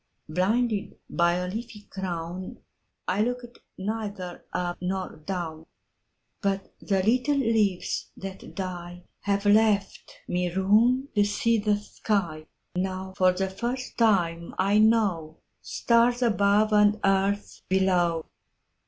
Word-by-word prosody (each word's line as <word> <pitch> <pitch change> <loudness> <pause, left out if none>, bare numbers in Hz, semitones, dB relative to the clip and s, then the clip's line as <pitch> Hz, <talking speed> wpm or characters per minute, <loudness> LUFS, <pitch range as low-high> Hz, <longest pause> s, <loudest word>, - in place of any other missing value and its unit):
Blinded 205 +6 0
by 170 0 +3
a 180 +1 -1
leafy 220 +2 -6
crownI 180 -1 -5 0.7
looked 245 0 -4 0.2
neither 200 -3 -4
up 175 -1 -2
nor 185 +1 -3
down—But 175 +3 -6
the 195 -2 0
little 250 +7 +2
leaves 220 -7 +1
that 195 0 -7
dieHave 185 +2 -5
left 210 -2 +1
me 180 0 0
room 225 +9 +3
to 205 - +4
see 230 +2 +1
the 210 0 +2
sky; 190 -6 -2 0.3
Now 190 +1 -3
for 185 -1 +4
the 190 +1 -1
first 245 +6 -4
time 170 -7 +2
I 200 +3 +3
knowStars 225 +4 +1
above 210 -1 +3
and 210 0 +5
earth 195 +1 +1
below. 180 -4 +2
195 Hz, 105 wpm, -26 LUFS, 180-220 Hz, 0.7 s, and